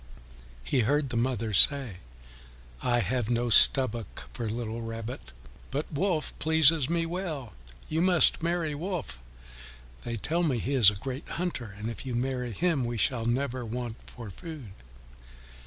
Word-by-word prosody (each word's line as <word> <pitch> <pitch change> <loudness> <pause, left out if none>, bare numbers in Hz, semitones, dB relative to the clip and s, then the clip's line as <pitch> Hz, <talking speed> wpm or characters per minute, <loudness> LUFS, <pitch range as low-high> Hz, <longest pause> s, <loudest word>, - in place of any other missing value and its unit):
He 130 - 0
heard 140 +4 +1
the 120 - -2
mother 115 -2 -1
say, 130 -2 +4 0.8
"I 120 -1 +1
have 120 -2 -1
no 120 0 0
stomach 120 +2 +5
for 120 -3 -4
little 115 0 -4
Rabbit, 115 - -7 0.4
but 145 +3 -4
Wolf 160 0 -1
pleases 160 -2 +3
me 170 0 0
well. 165 - -5 0.3
You 160 +1 -1
must 180 -2 +4
marry 170 -2 -1
Wolf. 155 - -5 0.8
They 115 -1 -4
tell 165 +10 -1
me 150 -8 +1
he 130 +5 -2
is 120 -8 +7
a 105 - -5
great 130 +7 -6
hunter, 135 - -4
and 105 +1 -5
if 115 -3 -6
you 130 -2 -4
marry 125 0 -2
him 165 - 0
we 120 0 -3
shall 115 0 +1
never 130 +1 -1
want 120 0 -5
for 115 -4 -9
food." 155 - -9
125 Hz, 155 wpm, -28 LUFS, 115-155 Hz, 0.8 s, is